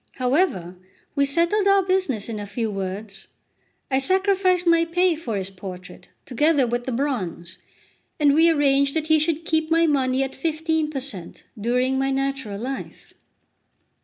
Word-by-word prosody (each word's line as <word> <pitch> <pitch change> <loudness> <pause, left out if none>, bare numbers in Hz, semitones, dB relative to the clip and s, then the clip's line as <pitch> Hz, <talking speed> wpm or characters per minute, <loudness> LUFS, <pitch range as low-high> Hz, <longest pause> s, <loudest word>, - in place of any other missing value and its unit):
However, 250 - 0 0.4
we 280 -1 +2
settled 340 +8 +1
our 395 0 +4
business 370 - 0
in 220 -2 -5
a 205 - -6
few 220 +2 -3
words. 195 +1 -6 0.6
I 265 - +3
sacrificed 375 +2 +2
my 335 -1 +4
pay 350 +1 +1
for 240 -10 -4
his 190 0 -3
portrait, 185 -1 -10 0.2
together 290 +2 +2
with 240 +1 -2
the 260 - -3
bronze, 190 - -3 0.6
and 290 -2 +4
we 325 +3 +5
arranged 280 -2 +2
that 315 0 -2
he 315 0 +5
should 325 +1 -1
keep 315 -1 0
my 330 0 +4
money 265 -3 +1
at 270 - -5
15 320 +1 -1
per 290 -3 -3
cent. 205 -11 -6
during 250 +4 0
my 270 0 +1
natural 270 -6 -2
life. 265 +4 -7
275 Hz, 160 wpm, -23 LUFS, 230-325 Hz, 0.6 s, we